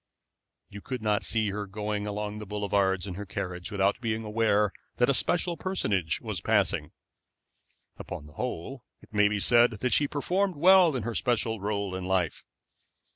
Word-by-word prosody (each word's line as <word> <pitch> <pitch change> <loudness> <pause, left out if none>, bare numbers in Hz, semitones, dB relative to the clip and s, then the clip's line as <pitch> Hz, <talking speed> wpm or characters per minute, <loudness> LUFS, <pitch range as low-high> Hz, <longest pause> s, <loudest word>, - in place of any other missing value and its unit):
You 100 - -10
could 125 -1 -5
not 105 -1 +1
see 110 -3 +1
her 105 0 -4
going 105 +1 -3
along 105 0 -4
the 105 - -8
boulevards 100 -2 0
in 95 - -5
her 100 +3 -6
carriage 90 -1 -5
without 100 +2 +1
being 110 -1 -2
aware 105 -2 +1 0.2
that 125 +2 +3
a - - +1
special 170 +6 0
personage 100 - -1
was - - -4
passing. - - +1 1.1
Upon 75 - -7
the 75 - -15
whole, 125 - -5 0.2
it - - -19
may 105 0 +4
be 105 0 -1
said 120 +3 +5
that 125 +4 -1
she 145 - +3
performed 180 +6 0
well 180 +1 +6
her 115 +1 -4
special 115 -2 0
role 100 -1 -2
in 95 0 -4
life. 95 -4 0
105 Hz, 170 wpm, -28 LUFS, 100-120 Hz, 1.1 s, well